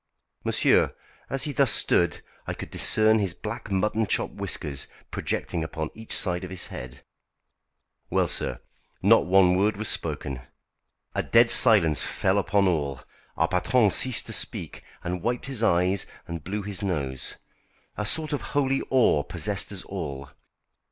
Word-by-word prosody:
Monsieur, - - +3 0.3
as 135 -1 0
he 150 - -1
thus 140 -2 +3
stood 85 -4 +2 0.2
I - - -3
could - - -8
discern 110 0 +3
his 95 -4 -2
black 105 +2 -6
mutton 105 +3 0
chop - - 0
whiskers 70 -2 -4 0.2
projecting 85 - -2
upon 80 0 -4
each 110 0 -12
side 90 -1 -1
of 90 - -6
his 95 -2 -2
head. 65 +2 -8 1.1
Well, - - +2
sir, - - -2 0.4
not - - +5
one 90 -1 +5
word 100 +2 +1
was 110 0 0
spoken. 65 -2 -1 0.7
A - - 0
dead 115 0 +4
silence 95 - +5
fell - - 0
upon 100 -1 +2
all. 70 -7 -1 0.4
Our - - +2
patron 105 +4 +2
ceased 130 +2 +3
to - - -5
speak, - - -2 0.2
and 90 0 -3
wiped 120 +4 -2
his 135 -4 -4
eyes 90 -2 +2 0.2
and 85 -2 -6
blew 105 +3 -4
his 100 -2 -5
nose. 70 -10 -2 0.6
A 105 - -3
sort 155 +8 +1
of 145 - -1
holy 135 -2 0
awe 125 - +4
possessed 95 +8 -3
us 95 -3 -7
all. 70 -8 -6
95 Hz, 155 wpm, -26 LUFS, 85-110 Hz, 1.1 s, not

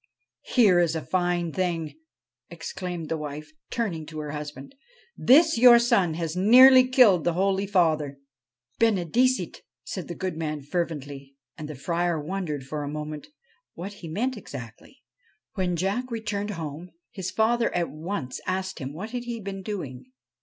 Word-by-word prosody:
' - - -65
Here 205 -8 +6
is 165 -2 +2
a 160 - -4
fine 175 -2 0
thing,' 165 -4 -2 0.6
exclaimed 170 0 -6
the 160 0 -2
wife, 150 0 -7 0.2
turning 175 -10 -3
to 155 0 -9
her 150 -1 -4
husband. 150 - -7 0.3
' 475 - -33 0.2
This 315 -2 +6
your 245 -1 +9
son 195 -8 +2
has 165 -1 -3
nearly 255 +6 +8
killed 235 - +5
the 175 - +1
holy 195 +1 +1
Father! 155 -7 +1 0.3
' 120 +2 -67
' 120 0 -48
Benedicite! 225 +1 +2
' - - -67
said 185 - -6
the 175 - -6
good 185 -2 -3
man 155 -2 -3
fervently, 145 -4 -4 0.2
and 155 -2 -7
the 150 - -6
Friar 170 +4 -1
wondered 155 -3 -4
for 150 +2 -4
a 145 - -4
moment 150 0 -6 0.5
what 195 +4 -6
he 170 - -7
meant 235 +10 -2
exactly. 135 - -10 0.5
When 180 -3 -1
Jack 195 +9 -1
returned 210 -3 -3
home 160 +2 -6 0.2
his 190 -6 -4
father 230 +3 +1
at 175 -1 0
once 155 -4 -5
asked 190 0 -2
him 135 0 -5
what 205 +8 -7
he 240 -1 -4
had 225 - -8
been 195 0 -5
doing. 145 - -6
175 Hz, 170 wpm, -26 LUFS, 155-205 Hz, 0.6 s, your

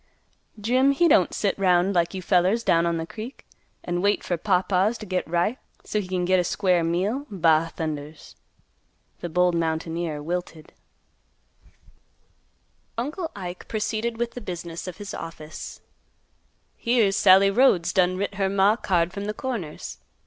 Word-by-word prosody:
Jim 255 +6 +3
he 340 +5 +3
don't 190 - +4
sit 200 - 0
'round 185 0 +3
like 170 +1 +1
you 185 - -5
fellers 185 +6 +2
down 170 -4 +3
on 170 -1 0
th' 165 0 -4
creek 225 - -9 0.4
an' 175 0 -2
wait 205 +1 +2
fer 175 - -1
pawpaws 190 +4 +1
to 215 - -8
git 185 -2 -2
ripe, 175 +9 0 0.2
so 210 - -1
he 185 - -8
can 180 -1 -1
git 185 +1 +3
a - - +2
square 180 -1 +1
meal, 195 - -1
ba 165 -4 +2
thundas!" 150 -2 -5 0.9
The 175 - -5
bold 180 +1 +2
mountaineer 165 -1 -2
wilted. 165 -1 -5 2.2
Uncle 305 +8 -3
Ike 180 -2 -7
proceeded 220 +1 -2
with 235 0 -2
the 245 - -8
business 170 -3 -6
of 180 - -6
his 205 -1 -7
office. 155 -2 -8 0.9
"Here's 230 -5 +2
Sallie 195 -1 +6
Rhodes 195 -7 +3
done 185 -1 +2
writ 200 +1 -2
her 190 - +2
maw 200 +1 +4
a - - -5
card 175 -5 0
from 200 +1 -5
th' 210 - -4
Corners. 220 -13 -5
185 Hz, 155 wpm, -25 LUFS, 170-210 Hz, 2.2 s, Sallie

